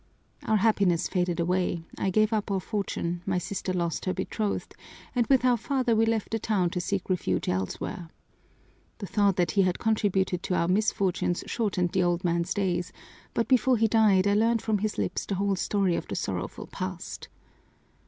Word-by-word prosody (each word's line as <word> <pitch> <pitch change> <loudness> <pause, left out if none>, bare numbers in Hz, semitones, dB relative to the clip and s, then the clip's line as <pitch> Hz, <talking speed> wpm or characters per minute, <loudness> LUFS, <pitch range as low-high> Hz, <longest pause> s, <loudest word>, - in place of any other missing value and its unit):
Our 220 - +3
happiness 195 -5 +2
faded 175 -2 -1
away, 175 -1 0
I 195 - -1
gave 215 +3 +2
up 210 -2 -1
our 195 -1 +1
fortune, 175 -4 -3
my 185 -2 +1
sister 185 +1 -3
lost 170 -3 -2
her 185 - -1
betrothed, 200 +2 -3 0.4
and 240 -2 +1
with 265 -2 +4
our 245 -1 +4
father 255 -1 0
we 225 +1 +3
left 225 -2 -1
the 225 - 0
town 195 -6 0
to 180 - -2
seek 190 +1 -2
refuge 135 - -1
elsewhere. 95 - -3 0.9
The 205 - -6
thought 200 -1 +2
that 175 -3 +1
he 200 - +3
had 185 -1 +1
contributed 195 -5 +1
to 180 - -1
our 170 - +1
misfortunes 190 -2 +1
shortened 190 -6 -1
the 190 - +1
old 175 0 +1
man's 170 +1 0
days, 180 -3 -1 0.4
but 230 - +1
before 255 -1 +4
he 225 +1 +3
died 210 -4 +4
I 200 - +3
learned 225 +2 +2
from 215 -2 +1
his 215 +1 -2
lips - - -2
the 200 - -1
whole 200 +1 +1
story 190 -2 +1
of - - -4
the - - -4
sorrowful - - -4
past. - - -6
195 Hz, 185 wpm, -27 LUFS, 180-215 Hz, 0.9 s, with